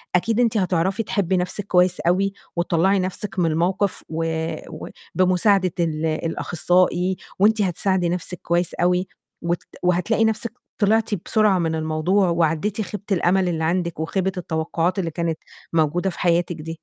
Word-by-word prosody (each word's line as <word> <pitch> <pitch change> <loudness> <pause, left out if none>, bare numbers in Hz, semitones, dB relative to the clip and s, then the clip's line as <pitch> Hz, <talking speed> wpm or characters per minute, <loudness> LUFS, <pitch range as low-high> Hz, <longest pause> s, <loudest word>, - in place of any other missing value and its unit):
أكيد 225 +6 +1
إن - - +5
أنتِ 225 -1 0
هتعرفي 190 +3 +1
تحبّي 190 -2 0
نَفْسِك 180 +3 -2
كويس 180 0 +3
أوي 195 +3 +1 0.2
وتطلّعي 180 +3 +2
نَفْسِك 185 +1 -3
من 165 -2 +2
الموقِف 180 +5 0
و 160 +1 -2 0.5
و 155 - -7 0.3
بمساعدة 185 0 +3
ال 160 -2 0
الأخصائي 175 +3 +1 0.2
وأنتِ 215 +2 +4
هتساعدي 185 -1 +1
نَفْسِك 180 0 -3
كويس 175 0 0
أوي، 180 +1 +1 0.3
وت 170 +1 -1 0.2
وهتلاقي 180 +6 +2
نَفْسِك 220 +1 -1 0.3
طلعتِ 220 +1 +2 0.2
بسرعة 210 -4 +3
من 165 -1 0
الموضوع، 160 +5 +1
وعدّيتِ 170 +5 0
خيبة 205 -1 -6
الأمل 185 0 +2
اللي 160 -1 -2
عندِك، 170 -1 -1
وخيبة 190 +4 -1
التوقّعات 170 +2 -1
اللي 170 -3 -2
كانت 165 0 -2 0.4
موجودة 165 +4 +1
في 180 - -8
حياتِك 175 -1 +1
دي. 165 +1 -7
180 Hz, 150 wpm, -22 LUFS, 170-195 Hz, 0.5 s, إن